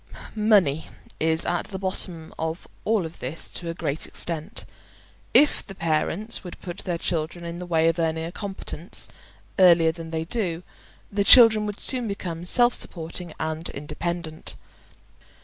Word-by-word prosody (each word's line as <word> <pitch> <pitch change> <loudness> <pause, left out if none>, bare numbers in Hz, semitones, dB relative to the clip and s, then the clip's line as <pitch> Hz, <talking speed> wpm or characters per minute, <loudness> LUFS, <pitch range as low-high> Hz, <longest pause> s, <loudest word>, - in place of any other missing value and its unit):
Money 200 -9 +3 0.3
is 160 0 +1
at 175 - 0
the 195 - -6
bottom 185 -3 -4
of 160 +2 -3 0.2
all 210 -6 +2
this 155 -1 -5
to 170 - -6
a - - -2
great 145 -2 -2
extent. 170 +5 -3 0.7
If 295 - +5
the 195 - -10
parents 165 +7 0
would 180 - -8
put 175 -2 -7
their 175 -2 -2
children 165 0 -2
in 170 +1 -5
the 180 - -6
way 165 -1 +3
of 165 +1 +2
earning 160 0 0
a 165 - -5
competence 190 -3 -6 0.5
earlier 170 -3 +7
than 165 0 -8
they 160 0 -2
do, 180 -4 -2 0.5
the 200 0 +1
children 220 -1 +8
would 205 -1 -5
soon 250 -3 -2
become 175 -4 -4
self 240 +4 +5
supporting 170 0 -4
and 160 +1 -2
independent. 160 +2 -4
170 Hz, 150 wpm, -25 LUFS, 160-195 Hz, 0.7 s, children